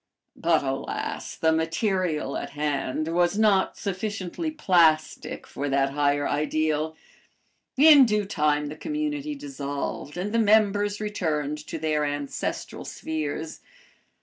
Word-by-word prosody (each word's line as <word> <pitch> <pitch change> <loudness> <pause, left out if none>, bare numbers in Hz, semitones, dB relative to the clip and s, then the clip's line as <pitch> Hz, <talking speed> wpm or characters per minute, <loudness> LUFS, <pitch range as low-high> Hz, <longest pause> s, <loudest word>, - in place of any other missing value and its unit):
But 165 -2 +2
alas! 135 0 -4
the 160 - +2
material 165 -2 0
at - - -4
hand 150 +1 -1
was 175 +3 +2
not 205 -3 +3
sufficiently 200 - -3
plastic 170 - +2
for 145 +1 -4
that 135 0 +2
higher 145 0 +1
ideal. 155 +1 0 0.8
In 290 -1 +9
due 210 -1 +1
time 150 -5 +1
the 150 - -7
community 300 - -3
dissolved 150 - -5
and 200 +4 -3
the 230 - +3
members 205 -1 +3
returned 155 -8 -2
to - - -4
their 155 -1 0
ancestral 145 -1 -3
spheres. 155 0 -4
160 Hz, 120 wpm, -26 LUFS, 150-210 Hz, 0.8 s, In